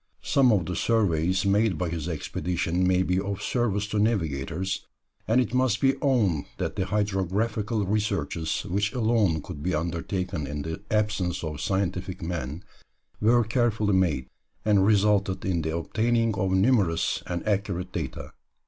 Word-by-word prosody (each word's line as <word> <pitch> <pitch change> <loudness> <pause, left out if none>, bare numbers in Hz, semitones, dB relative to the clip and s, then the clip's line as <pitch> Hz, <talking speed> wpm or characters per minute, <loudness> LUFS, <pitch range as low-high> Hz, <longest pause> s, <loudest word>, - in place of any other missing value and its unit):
Some 130 -3 +4
of 95 -6 +2
the 90 +1 -3
surveys 95 -4 +1
made 100 -2 +2
by 90 +1 -1
his 80 0 -3
expedition 90 +2 -1
may 95 0 +3
be 90 0 +1
of 100 0 -3
service 105 -5 0
to 105 - 0
navigators, 95 - -1 0.4
and 115 +3 +4
it 125 -2 0
must 125 -4 +2
be 135 0 +4
owned 105 - +2
that - - -3
the 95 - -1
hydrographical 105 +2 0
researches 100 -5 -1
which 100 +3 -1
alone 110 - +2
could 80 -6 -8
be 90 +2 0
undertaken 85 -1 -2
in 75 0 -4
the 80 +5 -5
absence 105 -5 0
of 75 -2 -4
scientific 95 -1 -2
men 80 -1 -4 0.6
were 120 +3 +4
carefully 110 -3 +1
made, 85 -9 +2 0.4
and 100 -2 +4
resulted 100 -2 +2
in 90 -3 0
the 80 +1 -2
obtaining 115 +5 +1
of 95 -1 0
numerous 95 -4 +2
and 85 +3 -4
accurate 95 -3 -1
data. 80 -7 -5
95 Hz, 150 wpm, -26 LUFS, 85-105 Hz, 0.6 s, Some